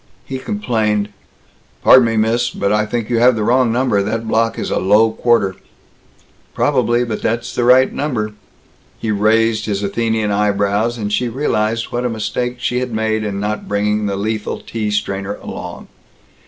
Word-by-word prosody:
He 130 -1 -5
complained, 110 - -1 0.7
"Pardon 130 -2 +7
me, 115 -1 -1
miss, 115 +2 +1
but 100 - -2
I 105 0 +1
think 115 0 -2
you 115 - +2
have 125 +1 +5
the 110 - -1
wrong 120 +1 +3
number. 120 -4 +1
That 110 +3 -3
block 115 +1 +1
is - - -3
a - - +1
low 105 +4 +4
quarter." 110 -5 +1 1.0
"Probably! 120 -4 +2
But 115 -3 -4
that's 120 +2 -2
the 120 - 0
right 130 +2 +5
number!" 115 -8 -2 0.6
He 110 - -2
raised 110 +1 +2
his 100 -1 -2
Athenian 110 +1 0
eyebrows, 105 +3 +1
and 105 -2 -3
she 125 +3 0
realized 115 -3 -1
what 120 +1 -2
a 125 - 0
mistake 120 +2 -2
she 125 0 -1
had 125 -1 -3
made 110 0 -1
in 100 -2 -3
not 105 +1 -3
bringing 105 +1 0
the 100 - -1
lethal 105 +1 -3
tea 110 -2 -4
strainer 100 -1 -2
along. - - -8
110 Hz, 170 wpm, -18 LUFS, 105-120 Hz, 1.0 s, Pardon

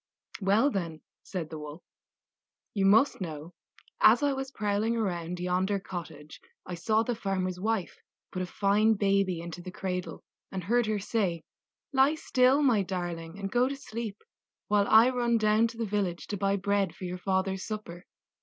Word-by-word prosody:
"Well, 210 +9 +3
then," 165 -6 -3 0.2
said 175 -5 -5
the 155 - -6
Wolf, 150 +3 -9 0.9
"you 195 -2 +2
must 220 +4 +4
know, 160 -1 -6 0.5
as - - +6
I 285 -1 +3
was 270 0 -4
prowling 215 0 0
around 180 -5 -2
yonder 185 +3 0
cottage 160 -5 -8 0.2
I 180 - -6
saw 215 +6 +1
the 245 - -1
farmer's 185 -4 -2
wife 215 -2 -1 0.3
put 185 - -3
a 180 - -2
fine 210 +4 +3
baby 195 -3 +1
into 170 +1 -7
the 185 - -7
cradle, 180 -1 -4 0.3
and 190 -2 -4
heard 235 +5 +2
her 215 -1 0
say: 190 -5 -1 0.5
'Lie 270 +3 +4
still, 265 -1 +3
my 240 -7 +4
darling, 175 -2 -4
and 195 -1 -4
go 245 +1 +3
to 280 - -3
sleep, 230 -6 -6 0.5
while 205 -1 +3
I 225 +3 +7
run 240 -2 +1
down 215 +1 +3
to 230 0 -10
the 230 - -1
village 195 -4 -2
to 205 - -2
buy 195 +1 +1
bread 200 -2 0
for - - -11
your 180 0 -4
father's 190 0 -1
supper. 205 -5 -7
195 Hz, 175 wpm, -29 LUFS, 180-225 Hz, 0.9 s, I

